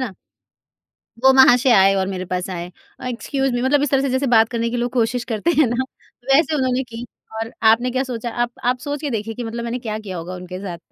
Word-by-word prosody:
ना? 195 - -10 1.1
वो 265 - +8
महाशय 260 -1 +6
आए 195 -1 +6
और 190 -1 0
मेरे 185 -1 -4
पास 180 +1 -3
आए। 175 -1 -5 0.3
अ, - - -8
एक्सक्यूज़ 270 +2 -2
मी 245 - -1
मतलब 275 +3 +2
इस 290 - 0
तरह 270 -1 +3
से 275 - 0
जैसे 260 +2 0
बात 225 0 +5
करने 235 -1 -1
की 245 - -3
लोग 240 0 -1
कोशिश 240 0 0
करते 225 +11 +1
हैं 305 - +5
ना 240 +3 0 0.5
वैसे 315 +2 +3
उन्होंने 260 -2 0
की। 235 -1 -8 0.3
और 225 +1 -4 0.2
आपने 240 +3 +3
क्या 260 +1 0
सोचा 240 -2 -4
आप 240 - -4
आप 250 +1 +2
सोच 290 +1 -4
के 295 - -2
देखिए 225 0 -3
कि 245 - -5
मतलब 230 +1 -5
मैंने 235 +1 -3
क्या 220 -3 -4
किया 195 -4 -6
होगा 175 +2 -6
उनके 180 0 -8
साथ? 185 -3 -6
240 Hz, 240 wpm, -20 LUFS, 215-260 Hz, 1.1 s, वो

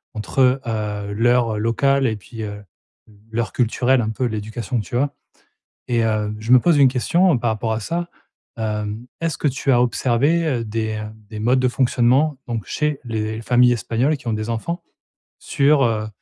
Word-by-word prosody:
entre, 130 +4 +1
heu, 105 -2 -3
l'heure 115 0 +2
locale 135 +4 +2
et 110 - -1
puis, 110 +2 -9
heu, 105 0 -6 0.7
l'heure 115 0 -2
culturelle, 125 +1 +2
un 110 - -2
peu 120 +4 -2
l'éducation 110 +1 -3
que 105 - -5
tu 120 - -3
as. 140 +2 0 0.7
Et 120 -2 +1
heu, 105 -1 -1
je 110 +2 -3
me 125 - +8
pose 170 0 +3
une 140 -2 +7
question, 170 +8 +2
heu, 125 - +1
par 120 -1 0
rapport 110 +1 -2
à 110 - -2
ça. 170 +9 -3 0.5
Hem 105 +1 -3 0.2
est-ce 165 -4 -1
que - - 0
tu 140 0 0
as 120 -1 +4
observé, 130 +7 +2
heu, 125 -7 -1
des, 110 0 -2
heu, 105 - -5 0.3
des 110 -1 -7
modes 125 +4 +2
de 130 - +2
fonctionnement 130 +3 +2
donc 115 -3 -3
chez 150 -2 -1
les 110 -1 -3
familles 125 +1 +4
espagnoles 120 +6 0
qui 130 - -12
ont 115 - 0
des 110 +1 -3
enfants 170 +10 -4 0.6
sur, 140 0 +2
heu, 110 -3 0
120 Hz, 190 wpm, -21 LUFS, 110-135 Hz, 0.7 s, me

